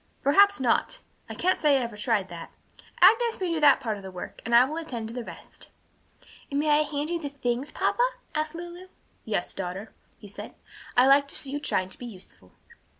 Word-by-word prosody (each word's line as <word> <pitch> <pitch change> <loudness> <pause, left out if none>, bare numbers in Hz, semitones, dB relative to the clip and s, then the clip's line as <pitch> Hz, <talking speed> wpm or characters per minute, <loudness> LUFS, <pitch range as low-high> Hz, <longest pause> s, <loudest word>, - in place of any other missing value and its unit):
"Perhaps 400 +6 +5
not. 250 -3 0 0.3
I - - -6
can't 370 +1 +1
say 295 -3 +5
I - - 0
ever 235 -2 -6
tried 210 -2 0
that. 170 -1 -8 0.5
Agnes 455 +5 +5
may 360 -3 -1
do 325 - -1
that 290 -2 +6
part 225 -6 -3
of - - -10
the 190 - -8
work, 180 -1 -9
and 235 +1 +1
I 240 +2 +8
will 305 +4 -5
attend 240 -9 -5
to - - -8
the 245 -1 -5
rest." - - -11 0.8
"And 280 - -1
may 305 +1 +1
I 295 +1 +5
hand 295 +1 -2
you 340 - -1
the 290 -3 -5
things, 265 -1 -2
papa?" - - 0 0.3
asked 310 +1 -2
Lulu. 345 +2 -8 0.4
"Yes, 205 -5 -1
daughter," 190 +3 -6 0.2
he 205 - -13
said, 200 - -9 0.4
"I 250 - +7
like 280 +1 +5
to - - -9
see 270 - -4
you 290 - -2
trying 185 -10 -1
to - - -7
be 245 - -7
useful." 185 - -13
275 Hz, 215 wpm, -26 LUFS, 220-310 Hz, 0.8 s, I